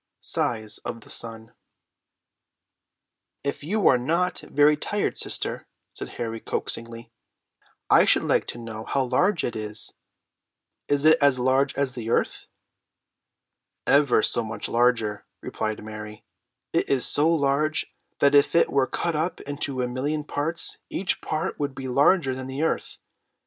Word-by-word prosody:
SIZE 110 -3 -2
OF 115 - -6
THE - - -12
SUN. 115 0 -3 1.9
"If 140 0 -3
you 205 +7 +1
are 125 - +5
not 170 +7 0
very 150 +1 +3
tired, 205 +7 -2
sister," - - -2 0.3
said - - -7
Harry 115 -1 -3
coaxingly, 115 +1 -4 0.8
"I - - +6
should - - +4
like - - +1
to - - -4
know 110 -2 -7
how 135 - 0
large 165 +9 +1
it 120 - -2
is. 110 -1 -4 0.9
Is 145 +1 +1
it 160 +1 +7
as 140 -2 +4
large 130 +2 +2
as 140 -3 -1
the 115 -3 -5
earth?" - - 0 1.4
"Ever 140 -3 +4
so 120 - +1
much 110 0 -5
larger," 115 -3 +1
replied 110 -1 -4
Mary. 105 0 -9 0.5
"It - - +1
is 135 -2 +2
so 150 +3 +3
large 155 0 +1 0.3
that 140 - +5
if 145 +2 +4
it 170 - +4
were 135 -1 +2
cut 170 -2 -1
up 165 +4 -1
into 140 -2 -2
a - - 0
million 145 +5 -2
parts, 155 +3 -3
each 185 - -2
part 155 0 -3
would 145 -2 -2
be 135 - -5
larger 140 +2 +3
than 130 0 -6
the 135 +3 -3
earth. 160 - -1
135 Hz, 150 wpm, -25 LUFS, 115-150 Hz, 1.9 s, it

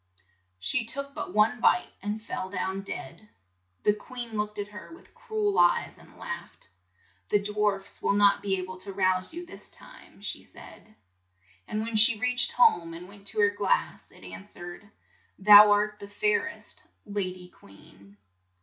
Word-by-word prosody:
She 95 - +2
took 280 +5 -3
but - - -5
one 210 +4 +3
bite, 240 - +3
and 205 +2 -3
fell 190 -4 -5
down 190 0 -3
dead. 185 +1 -8 0.5
The 210 - +4
queen 235 +2 -7
looked 210 0 -2
at 205 0 -4
her 210 +8 -11
with 335 - -16
cru 435 -2 -2
el 405 - +1
eyes, 175 0 +3
and - - -18
laughed. - - -8 0.6
"The - - +4
dwarfs 205 -1 -2
will - - +2
not 200 0 +4
be 195 -2 0
a - - -3
ble 185 0 -9
to 195 +2 -8
rouse 185 -1 +1
you 345 +2 -7
this 355 - -9
time," - - -14
she - - -4
said. 215 0 -15 0.7
And 215 - -2
when 230 0 -4
she 225 +1 +6
reached 250 +2 +1
home, 170 -8 +3
and 175 +2 -9
went 200 0 -11
to 210 - 0
her 205 0 +4
glass, 205 -1 -1
it - - -18
an 90 +1 -9
swered: 175 +4 -10 0.3
" - - -37
Thou 210 0 +11
art 210 +1 +2
the 200 - -9
fair 425 - +1
est, - - -13 0.2
la 205 0 -2
dy 185 -1 -6
queen." 100 - -19
205 Hz, 180 wpm, -27 LUFS, 185-220 Hz, 0.7 s, Thou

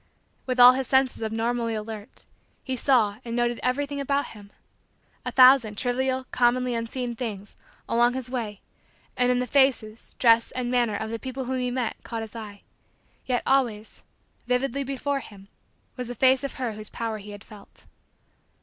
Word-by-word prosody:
With 255 -1 -1
all 245 0 +11
his 260 -1 -2
senses 265 -2 +2
abnormally 230 +1 -1
alert, 215 +1 -7 0.4
he 260 - -3
saw 235 -6 +2
and 235 -1 -5
noted 240 0 0
everything 280 +3 -1
about 280 +1 -1
him. 205 -2 -13 0.7
A - - -3
thousand 255 -5 +6
trivial, 260 +2 -1
commonly 250 0 +2
unseen 235 +1 -3
things, 210 -4 -6 0.3
along 240 +1 +3
his 260 -2 -4
way 225 -5 -4 0.5
and 250 0 +2
in 250 - +3
the 250 - 0
faces, 250 -4 +1
dress, 230 -1 +4
and 250 -1 -3
manner, 240 -4 +1
of 220 +2 -4
the 230 - -4
people 260 +1 -5
whom 260 +1 -2
he 250 0 -1
met, 245 -2 -2
caught 230 -1 -5
his 220 0 -10
eye. 210 -3 -9 0.6
Yet, 250 -2 0
always, 235 -6 0 0.5
vividly 260 +2 0
before 275 +1 -2
him, 200 -5 -13 0.5
was 250 -2 -5
the 245 - -6
face 260 +3 +3
of 275 - -4
her 250 -3 -2
whose 215 0 -8
power 225 -2 -4
he 205 +1 -11
had 205 0 -10
felt. 210 -2 -16
245 Hz, 170 wpm, -25 LUFS, 225-260 Hz, 0.7 s, all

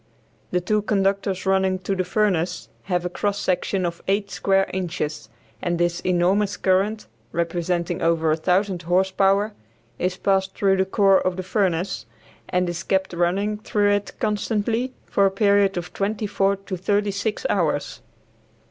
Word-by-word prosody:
The 180 - 0
two 210 +4 +1
conductors 195 -2 0
running 190 -1 +2
to 195 +2 -1
the 185 - 0
furnace 180 -3 0 0.2
have 180 -2 -1
a - - -1
cross 205 +3 -1
section 185 0 0
of 170 -1 -4
eight 200 +1 0
square 195 0 +2
inches, 160 -8 -3 0.3
and 175 -1 -1
this 175 0 0
enormous 190 +3 +1
current, 195 +3 +1 0.3
representing 170 +1 -1
over 165 -1 +2
1000 180 +4 +1
horse 180 +3 +1
power, 195 +2 +2 0.5
is 180 +1 -1
passed 190 0 +1
through 195 -1 +2
the 190 - +2
core 195 0 +4
of 185 -1 0
the 185 - -3
furnace, 185 - -1 0.4
and 180 0 +1
is 175 0 -3
kept 190 +1 0
running 195 +5 0
through 205 -1 +1
it 205 0 -1
constantly 220 +3 0
for 200 -1 +3
a - - +2
period 200 -1 +3
of 175 0 -5
twenty 210 +2 -1
four 200 -1 +1
to 195 -1 -6
thirty 205 +3 +1
six 210 - -3
hours. - - -1
190 Hz, 155 wpm, -23 LUFS, 180-200 Hz, 0.5 s, core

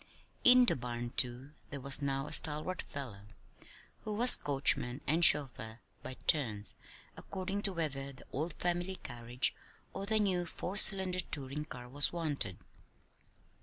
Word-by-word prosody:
In 250 0 +5
the - - -1
barn, 120 -1 -7
too, 125 +3 -3 0.2
there 140 - -8
was 140 +1 -1
now 135 0 -4
a - - -6
stalwart 155 +4 +2
fellow 110 -8 -11 0.8
who 215 -1 -6
was 245 +3 +5
coachman 135 -2 -1
and 160 +4 -1
chauffeur 120 -7 +4 0.2
by 130 - -9
turns, 110 -9 -1 0.4
according 195 +1 -7
to 200 -2 -3
whether 140 -5 -5
the 130 - -16
old 155 +5 -5
family 175 +1 -4
carriage 120 -4 -5 0.4
or 195 - -8
the 220 +1 -1
new 185 -4 -2
four 180 +3 -8
cylinder 190 -3 +8
touring 150 -3 -5
car 125 -5 -11
was 145 +3 +1
wanted. 145 - -3
145 Hz, 145 wpm, -30 LUFS, 125-180 Hz, 0.8 s, cylinder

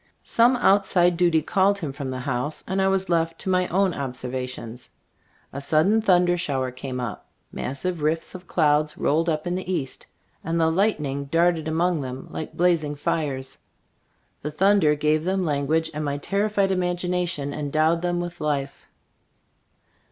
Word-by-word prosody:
Some 240 +2 +4
outside 190 -6 +3
duty 165 -3 +3
called 195 +4 +2
him 155 -8 -5
from 140 -1 -5
the 130 0 -4
house 130 +3 -3
and 190 +1 0
I 190 - +3
was 195 0 +1
left 165 -1 0
to 190 - -2
my 185 -1 +2
own 190 0 +1
observations. 125 -3 -5 0.6
A 140 - -5
sudden 160 +10 +3
thunder 180 -3 +3
shower 135 -6 -1
came 130 0 -6
up; 120 -4 -5 0.2
massive 160 +6 -3
rifts 155 +2 -1
of 180 -1 -10
clouds 150 -2 +2
rolled 160 +4 +1
up 155 -1 -1
in 175 - -1
the 185 0 -3
east, 135 -7 -4 0.4
and 165 +1 -1
the 160 0 +3
lightning 150 -7 0
darted 165 +1 +1
among 165 0 +1
them 130 0 -6
like 160 - -6
blazing 165 -4 +2
fires. 135 -3 -3 0.8
The 150 - -3
thunder 175 -1 +3
gave 150 +1 +1
them 190 +1 0
language 155 +2 0
and 150 +1 -3
my 145 -1 -2
terrified 200 +4 0
imagination 180 -5 -1
endowed 155 +3 +1
them 175 0 -1
with 175 0 -6
life. 140 -2 -2
160 Hz, 160 wpm, -24 LUFS, 145-180 Hz, 0.8 s, Some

